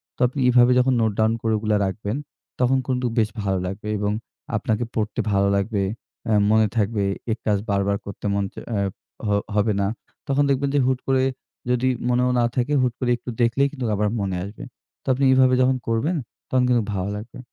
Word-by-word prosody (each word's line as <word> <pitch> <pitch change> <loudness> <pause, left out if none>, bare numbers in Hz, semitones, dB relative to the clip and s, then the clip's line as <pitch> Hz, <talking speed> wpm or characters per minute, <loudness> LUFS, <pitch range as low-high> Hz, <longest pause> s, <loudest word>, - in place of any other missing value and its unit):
তো - - -33
আপনি 135 +3 -6
এভাবে 125 0 +6
যখন 130 +1 +3
নোট 110 -1 +2
ডাউন 110 +1 +3
করে 110 -1 +1
ওগুলা 105 0 +1
রাখবেন, 105 +5 -3 0.4
তখন 130 +1 +3
কিন্তু 125 -1 0
বেশ 110 -1 +3
ভালো 95 -1 0
লাগবে 100 +3 -5
এবং 105 0 0 0.5
আপনাকে 110 +2 -1
পড়তে 105 -1 -2
ভালো 100 0 +3
লাগবে। 100 0 0 0.5
এ্যা 110 -2 +3
মনে 110 0 +4
থাকবে 105 -1 +1 0.3
এই 110 - 0
কাজ 105 -2 +3
বারবার 100 0 +1
করতে 100 - -8
মন 100 0 +1
চা - - -8
এ্যা 100 -2 0 0.5
হ - - 0 0.3
হবে 105 0 +2
না। 100 - +1 0.4
তখন 140 +1 +2
দেখবেন 140 +1 +1
যে 145 - +4
হুট 130 -1 +1
করে 130 -1 +3 0.5
যদি 125 +1 +2 0.2
মনেও 125 +1 +2
না - - +3
থাকে 130 +4 0
হুট 125 -2 +1
করে 125 -2 0
একটু 120 - -9
দেখলেই 130 +4 +3
কিন্তু 130 -5 -4
আবার 105 +1 +1
মনে 95 -2 -1
আসবে। 100 +2 -8 0.4
তো - - -28
আপনি 135 +2 -1
এভাবে 130 -1 +5
যখন 130 +1 +3
করবেন 115 +10 +1 0.3
তখন 130 -1 +2
কিন্তু 120 -3 +3
ভালো 95 +1 -2
লাগবে। 110 +3 -9
115 Hz, 200 wpm, -23 LUFS, 105-125 Hz, 0.5 s, এভাবে